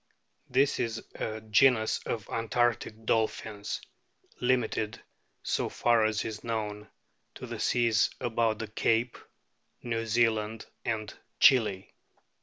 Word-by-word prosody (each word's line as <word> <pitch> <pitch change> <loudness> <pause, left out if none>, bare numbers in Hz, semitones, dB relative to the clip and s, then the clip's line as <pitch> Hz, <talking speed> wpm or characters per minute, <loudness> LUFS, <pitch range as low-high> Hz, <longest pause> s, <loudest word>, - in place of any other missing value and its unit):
This 135 +3 +2
is 115 -1 -2
a 110 0 -4
genus 110 +1 +3
of 110 -3 -3
antarctic 115 -1 -1
dolphins, 110 -2 -1 0.6
limited, 125 -4 0 0.4
so - - -1
far 120 -2 +3
as 110 0 0
is 110 -1 -5
known, 105 -2 -3 0.5
to - - -7
the - - -6
seas 115 -3 +3
about 115 -2 0
the 110 - -5
Cape, 115 +3 +1 0.7
New 115 -1 -2
Zealand, 110 -1 +1 0.2
and 110 -2 -2 0.3
Chili. 105 -7 +4
110 Hz, 110 wpm, -29 LUFS, 110-120 Hz, 0.7 s, Chili